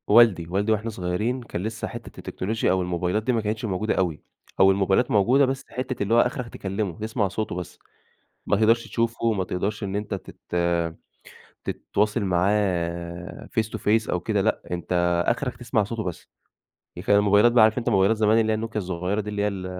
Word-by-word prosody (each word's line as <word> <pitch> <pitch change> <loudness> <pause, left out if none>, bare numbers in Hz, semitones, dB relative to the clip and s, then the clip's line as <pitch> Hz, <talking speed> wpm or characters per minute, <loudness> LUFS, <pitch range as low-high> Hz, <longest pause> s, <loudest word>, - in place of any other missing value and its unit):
والدي، 105 -7 +5
والدي 100 +4 0
وإحنا 110 +1 0
صغيرين 105 +6 -2
كان 90 -6 -5
لسه 110 +1 -4
حتة 120 0 -9
التكنولوجيا 110 +4 -1
أو 95 - +2
الموبايلات 90 +3 -1
دي 125 - +1
ما 115 - +1
كانتش 110 +2 -2
موجودة 105 +1 -1
أوي، 85 -5 -1 0.4
أو 95 0 +7
الموبايلات 95 +5 +2
موجودة 120 +7 +4
بس 135 +1 -3
حتة 130 -3 -3
اللي 100 +3 0
هو 120 - +6
آخرك 125 -1 -2
تكلمه، 95 -2 -3
تسمع 110 -1 -1
صوته 105 0 -3
بس، 90 -2 -7 0.7
ما - - +2
تقدرش 115 +2 +3
تشوفه، 115 0 0
ما 95 -3 -1
تقدرش 100 +5 -3
إن 100 0 -3
أنتَ 105 0 -3
تت 95 -1 -7 1.3
تتواصل 105 +3 -1
معاه 90 -2 -1
Face - - +3
to 110 - -5
face 110 +2 +1
أو 90 - 0
كده، 100 +3 0
لأ 110 - 0
أنتَ 85 0 +1
آخرك 120 0 -1
تسمع 115 -2 0
صوته 110 +2 -4
بس. 90 -4 -6 0.8
كان 105 - +4
الموبايلات 105 +4 +4
عارف 110 0 +6
أنتَ 120 - 0
موبايلات 100 +3 +3
زمان 110 +1 +4
اللي 110 -1 +2
هي - - +2
نوكيا 110 0 -3
الصغيرة 90 +3 -2
دي 105 - -6
اللي 105 -1 -2
هي 105 - +2
ال 95 -3 -4
105 Hz, 190 wpm, -24 LUFS, 95-115 Hz, 1.3 s, أو